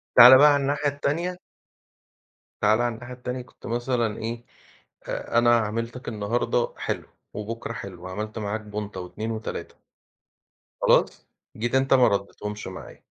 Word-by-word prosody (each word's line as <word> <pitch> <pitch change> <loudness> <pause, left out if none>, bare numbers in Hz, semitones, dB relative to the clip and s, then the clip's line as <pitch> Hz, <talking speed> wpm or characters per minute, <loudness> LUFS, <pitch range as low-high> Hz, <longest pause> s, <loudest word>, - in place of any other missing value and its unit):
تعالَ 125 +2 +11
بقى 145 +1 +7
على 145 - +2
الناحية 145 +1 0
التانية. 165 +6 -2 1.2
تعالَ 110 +2 +4
على 120 -1 0
الناحية 120 +2 -9
التانية. 125 0 -5
كنت 125 - -16
مثلًا 120 -2 -1
إيه 115 +1 -5 0.6
آآ 115 - -2
أنا 120 0 +5
عاملتك 115 +3 -4
النهاردة 115 +2 -1
حلو - - -3 0.3
وبكرا 115 +2 -5
حلو، 95 -5 -8
عملت 105 +4 -5
معاك 105 +1 -3
بونطة 105 -2 -6
و2 110 +5 -5
و3 110 0 -5 1.1
خلاص؟ - - +3 0.3
جيت 120 +3 -2
أنت 135 0 +4
ما 125 -2 +6
ردتهمش 105 +1 -3
معايا. - - -10
115 Hz, 135 wpm, -25 LUFS, 105-125 Hz, 1.2 s, تعالَ